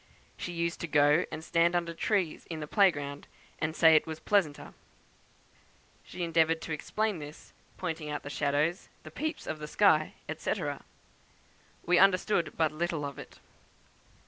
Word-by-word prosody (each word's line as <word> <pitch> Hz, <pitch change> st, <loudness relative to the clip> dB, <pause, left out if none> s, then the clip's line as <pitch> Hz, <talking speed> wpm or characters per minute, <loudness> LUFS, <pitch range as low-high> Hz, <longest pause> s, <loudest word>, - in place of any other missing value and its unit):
She 175 Hz, -, -5 dB
used 170 Hz, 0 st, -2 dB
to 170 Hz, -, -3 dB
go 150 Hz, +3 st, +4 dB
and 160 Hz, -, -6 dB
stand 170 Hz, +1 st, +2 dB
under 170 Hz, -1 st, 0 dB
the -, -, -10 dB
trees 185 Hz, -2 st, -1 dB
in 165 Hz, -2 st, -5 dB
the 150 Hz, -, -4 dB
play 195 Hz, +5 st, +5 dB
ground, 145 Hz, -3 st, -6 dB, 0.3 s
and 155 Hz, +1 st, -2 dB
say 160 Hz, -1 st, +6 dB
it 155 Hz, -, +3 dB
was 160 Hz, 0 st, -5 dB
pleasanter. 160 Hz, -5 st, 0 dB, 1.3 s
She 180 Hz, -, -6 dB
endeavoured 165 Hz, -1 st, +2 dB
to 165 Hz, -, -6 dB
explain 210 Hz, +5 st, -2 dB
this, 150 Hz, +1 st, -11 dB, 0.2 s
pointing 160 Hz, -4 st, -4 dB
out 150 Hz, -, -4 dB
the 145 Hz, -, -7 dB
shadows, 150 Hz, +7 st, 0 dB
the -, -, -10 dB
peeps 315 Hz, 0 st, -4 dB
of 150 Hz, -1 st, -5 dB
sky, 160 Hz, -6 st, +3 dB, 0.2 s
&c. -, -, -1 dB, 1.3 s
We 175 Hz, +1 st, +4 dB
understood 185 Hz, -2 st, +3 dB
but 160 Hz, -2 st, +2 dB
little 165 Hz, -1 st, -2 dB
of 140 Hz, -1 st, -7 dB
it. -, -, -11 dB
165 Hz, 160 wpm, -30 LUFS, 150-175 Hz, 1.3 s, say